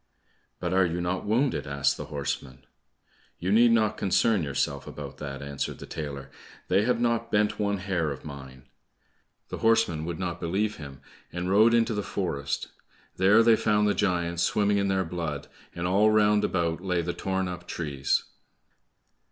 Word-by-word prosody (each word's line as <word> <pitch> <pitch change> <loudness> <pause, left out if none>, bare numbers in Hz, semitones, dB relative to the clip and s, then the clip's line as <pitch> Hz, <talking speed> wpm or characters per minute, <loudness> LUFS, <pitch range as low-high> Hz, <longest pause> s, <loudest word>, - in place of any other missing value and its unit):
"But 90 0 -2
are 95 0 +4
you 85 -1 -1
not 90 +2 -2
wounded?" 120 - +1
asked 70 0 +1
the - - -6
horsemen. 70 -2 -5 0.7
"You 90 +3 -2
need 120 +3 +6
not 110 -2 +2
concern 100 +1 +2
yourself 70 -1 -2
about 70 -2 -8
that," 70 -1 -6
answered 70 -1 -4
the - - -9
tailor, 70 -3 -6 0.4
"They 95 +2 +4
have 125 -1 +1
not 115 -1 0
bent 105 0 +1
one 100 -1 0
hair 95 -4 -1
of 70 0 -7
mine." 65 -3 -10 0.9
The - - -5
horsemen 115 -9 +2
would 85 -1 -4
not 90 -2 -3
believe 100 +5 -1
him, 70 -2 -10 0.3
and 90 +1 -3
rode 110 +4 +5
into 115 0 +2
the 105 - -1
forest; 70 -9 -3 0.5
there 105 +4 +5
they 115 -1 +6
found 105 -1 +2
the 105 - +3
giants 85 -4 0
swimming 100 +3 +2
in 100 - +1
their 95 -1 +1
blood, 80 -4 -4 0.3
and 85 - -3
all 100 +4 +4
round 105 -1 +4
about 85 -2 0
lay 90 -2 0
the 85 +1 -2
torn 95 -1 -2
up 90 0 -7
trees. 70 -5 -1
90 Hz, 170 wpm, -27 LUFS, 75-105 Hz, 0.9 s, need